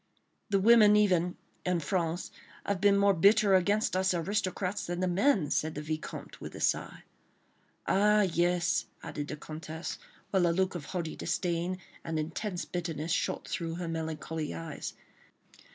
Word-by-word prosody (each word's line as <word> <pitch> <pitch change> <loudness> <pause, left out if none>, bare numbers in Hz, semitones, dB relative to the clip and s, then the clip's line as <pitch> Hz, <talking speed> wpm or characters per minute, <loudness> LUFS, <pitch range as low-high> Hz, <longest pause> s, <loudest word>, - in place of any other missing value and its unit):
"The 200 -1 +3
women 210 0 +7
even, 180 -4 +3 0.3
in 180 -1 +1
France, 170 +2 -2 0.3
have 200 -2 -1
been 200 -1 +5
more 200 0 +5
bitter 200 +3 +5
against 200 +3 +3
us 185 0 +2
aristocrats 190 +2 -1
than 175 0 -3
the 185 - +1
men," 185 - +2
said 155 0 0
the 150 - -4
Vicomte, 155 0 -6
with - - -7
a - - -7
sigh. - - -1 0.8
"Ah, 210 +2 +4
yes," 175 -1 +1 0.2
added 145 0 -5
the 150 - -4
Comtesse, 160 +2 -6 0.3
whilst 185 -3 +3
a - - +3
look 190 +2 +1
of 170 -5 -6
haughty 165 0 -4
disdain 175 0 -1 0.3
and 165 -1 -3
intense 175 +4 -3
bitterness 165 -2 -3
shot - - -1
through 165 -1 -3
her 175 0 -4
melancholy 160 - -4
eyes. 80 0 -6
180 Hz, 150 wpm, -30 LUFS, 165-195 Hz, 0.8 s, women